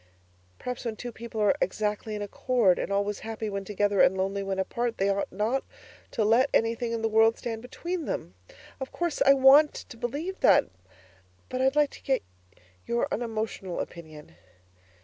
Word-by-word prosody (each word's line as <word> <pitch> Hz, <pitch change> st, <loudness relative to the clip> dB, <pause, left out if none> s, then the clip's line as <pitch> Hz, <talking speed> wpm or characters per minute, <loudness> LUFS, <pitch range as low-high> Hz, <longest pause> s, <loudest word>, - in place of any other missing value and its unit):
Perhaps 250 Hz, -1 st, -5 dB
when 230 Hz, -3 st, -3 dB
two 245 Hz, +3 st, -6 dB
people 230 Hz, -1 st, -7 dB
are 205 Hz, -, +4 dB
exactly 210 Hz, +2 st, -1 dB
in 210 Hz, -, -3 dB
accord, 205 Hz, -1 st, +2 dB
and -, -, -3 dB
always 200 Hz, +1 st, 0 dB
happy 220 Hz, -1 st, -5 dB
when 200 Hz, 0 st, -3 dB
together 205 Hz, 0 st, +1 dB
and 190 Hz, -, +4 dB
lonely 195 Hz, +1 st, -1 dB
when 195 Hz, -1 st, -3 dB
apart, 235 Hz, +5 st, -2 dB
they 195 Hz, +1 st, +1 dB
ought 200 Hz, 0 st, -1 dB
not 220 Hz, +8 st, 0 dB, 0.5 s
to 220 Hz, -, -1 dB
let 240 Hz, +6 st, +4 dB
anything 230 Hz, +1 st, +1 dB
in 230 Hz, -1 st, -3 dB
the -, -, +3 dB
world 225 Hz, +1 st, +4 dB
stand 225 Hz, -2 st, -5 dB
between 335 Hz, +7 st, -5 dB
them. 90 Hz, -, -4 dB, 0.5 s
Of 265 Hz, -, -5 dB
course 345 Hz, -3 st, -2 dB
I 275 Hz, -, +7 dB
WANT 275 Hz, +3 st, +6 dB
to 230 Hz, -, -10 dB
believe 295 Hz, +11 st, -4 dB
that! -, -, +5 dB, 0.8 s
But 255 Hz, -, -2 dB
I'd 265 Hz, +2 st, +2 dB
like 295 Hz, -1 st, +3 dB
to -, -, -13 dB
get 270 Hz, -, 0 dB, 0.6 s
your 235 Hz, 0 st, 0 dB
unemotional 220 Hz, -5 st, -3 dB
opinion. 155 Hz, -, -8 dB
225 Hz, 175 wpm, -27 LUFS, 200-250 Hz, 0.8 s, I